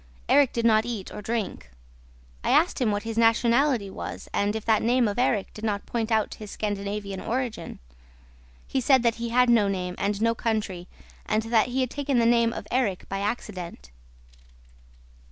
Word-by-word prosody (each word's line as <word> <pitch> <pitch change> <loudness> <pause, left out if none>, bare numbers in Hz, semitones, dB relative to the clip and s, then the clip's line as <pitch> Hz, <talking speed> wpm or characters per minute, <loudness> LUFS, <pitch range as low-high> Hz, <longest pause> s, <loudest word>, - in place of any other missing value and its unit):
Erik 285 -3 +5
did 235 -1 -2
not 220 -1 +5
eat 225 -5 -5
or 210 - -6
drink. 210 - -3 0.7
I - - -1
asked 320 -2 +3
him 240 - +3
what 205 0 -1
his 225 0 -3
nationality 235 +1 +3
was - - -7
and 205 +1 0
if 220 - -4
that 220 -2 +3
name 240 +1 +3
of 205 +2 -2
Erik 220 -6 +1
did 215 - -10
not 205 -2 -1
point 230 -1 -2
to 220 -2 +2
his 210 -1 -8
Scandinavian 200 -1 -4
origin. 245 -1 -3 0.9
He 265 - -1
said 260 -1 +4
that 230 -1 +2
he 235 - -2
had 250 +2 +4
no 230 -4 +4
name 180 -2 -2
and 200 0 -1
no 230 +1 +2
country 210 -6 -2 0.4
and 215 +1 +1
that 225 -1 +2
he 255 +2 -1
had 255 -1 -1
taken 285 -2 -1
the 235 - +3
name 235 0 +4
of 205 - -6
Erik 225 -8 0
by 195 - -2
accident. 185 - -5
225 Hz, 185 wpm, -26 LUFS, 205-240 Hz, 0.9 s, Erik